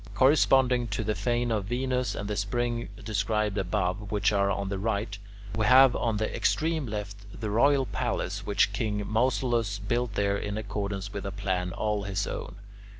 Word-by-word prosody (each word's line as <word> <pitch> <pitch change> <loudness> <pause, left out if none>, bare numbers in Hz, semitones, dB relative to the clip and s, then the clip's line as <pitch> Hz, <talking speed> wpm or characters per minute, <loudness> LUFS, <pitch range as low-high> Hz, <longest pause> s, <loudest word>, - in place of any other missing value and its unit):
Corresponding 130 -3 +4
to 105 +1 -2
the 110 0 0
fane 120 +4 0
of 105 -3 0
Venus 125 0 -1
and 100 - -4
the 105 - -2
spring 120 +4 -1 0.2
described 105 -1 0
above, 95 +2 -1
which 105 -1 +2
are 100 -1 +2
on 100 0 -2
the 100 -1 -3
right, 105 0 -1 0.4
we 110 -1 +1
have 130 0 +7
on 115 -2 0
the 110 +1 -2
extreme 160 -3 0
left 100 -1 -7
the 105 -2 -3
royal 135 +5 +4
palace - - -2
which - - +2
king 105 -2 -1
Mausolus 115 -2 +1
built 115 +2 -2
there 100 0 +1
in 105 0 -4
accordance 100 -2 -4
with 100 - -4
a 100 - -4
plan 95 -2 -2
all 105 +2 -1
his 100 0 -2
own. - - -5
105 Hz, 175 wpm, -28 LUFS, 100-120 Hz, 0.4 s, have